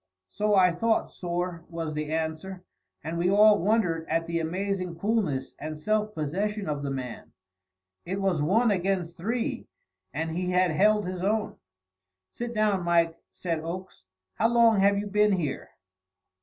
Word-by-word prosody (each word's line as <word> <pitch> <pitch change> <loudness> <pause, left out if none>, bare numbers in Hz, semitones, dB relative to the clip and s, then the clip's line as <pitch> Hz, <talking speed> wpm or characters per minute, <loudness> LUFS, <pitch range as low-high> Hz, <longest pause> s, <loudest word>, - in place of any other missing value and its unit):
"So 210 - +1
I 180 -2 +5
thought, 225 +6 0
sorr," 175 -1 -3
was 165 -2 -4
the 150 0 -3
answer. 160 +4 -3 0.4
And 165 +2 -3
we 175 +1 +2
all 210 +1 +6
wondered 180 -5 +1
at 165 +1 +1
the 170 0 -1
amazing 185 +1 -2
coolness 175 - -1
and 155 +1 -5
self 215 +5 -1
possession 195 +7 -2
of 145 -2 -2
the 140 - -3
man. 130 -3 -6 0.7
It 190 +3 -3
was 190 -6 +1
one 215 +9 +3
against 180 -3 -1
three, 235 - -2 0.4
and 160 +3 -3
he 180 +2 -2
had 180 -1 +3
held 210 +5 +3
his 180 0 -4
own. 210 +1 0 0.8
"Sit 240 0 -5
down, 210 -3 +2
Mike," 170 -1 +2
said 165 -3 -3
Oakes. 170 - -7 0.3
"How 225 - +2
long 230 -2 +4
have 200 +1 +4
you 205 - -2
been 210 0 +3
here?" 160 -7 -2
180 Hz, 155 wpm, -27 LUFS, 165-210 Hz, 0.8 s, all